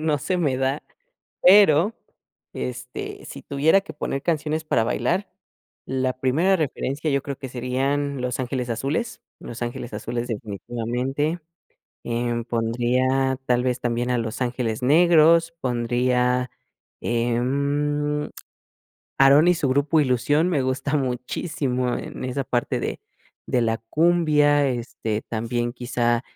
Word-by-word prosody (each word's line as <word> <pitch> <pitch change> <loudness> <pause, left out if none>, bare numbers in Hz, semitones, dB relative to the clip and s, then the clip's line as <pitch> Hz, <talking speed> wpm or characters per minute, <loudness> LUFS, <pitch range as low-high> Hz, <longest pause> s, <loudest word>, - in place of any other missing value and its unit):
no 155 -2 +1
se 185 +7 -1
me 150 -7 +1
da, 135 +2 -1 0.6
pero 195 0 +6 0.6
este 65 0 -6
si - - -9
tuviera 150 +7 +3
que 200 - -10
poner 135 - -3
canciones 155 -1 -1
para 115 - +2
bailar, 125 - -1 0.6
la 130 -1 0
primera 160 +10 +2
referencia 150 -1 -2
yo 140 -1 +1
creo 140 -2 -5
que 135 - -7
serían 135 +3 -1
Los 125 0 -2
Ángeles 125 -1 -3
Azules, 140 - -2 0.2
Los 120 - -9
Ángeles 120 0 -5
Azules 120 +3 -3
definitivamente, 120 - -3 0.6
em, 120 0 -1
pondría 125 +3 +1
tal 125 -1 +2
vez 125 -1 0
también 120 0 -1
a 125 - +1
Los 115 +1 -4
Ángeles 120 -2 -2
Negros, 165 +3 +5
pondría, 125 +1 +1 0.5
em, 140 +5 0 0.9
Aarón 140 +5 +6
y - - +7
su 160 -5 -1
grupo 140 +4 +2
Ilusión 145 +5 +2
me 150 -7 +1
gusta 135 +3 -1
muchísimo 125 -1 -2
en - - -7
esa 130 +2 -2
parte 120 -1 -1
de - - -3 0.5
de 125 - +1
la 115 -1 +1
cumbia, 150 -3 +3
este 115 -3 -3
también 120 +1 -2
quizá, 120 -1 0
130 Hz, 125 wpm, -23 LUFS, 120-150 Hz, 0.9 s, y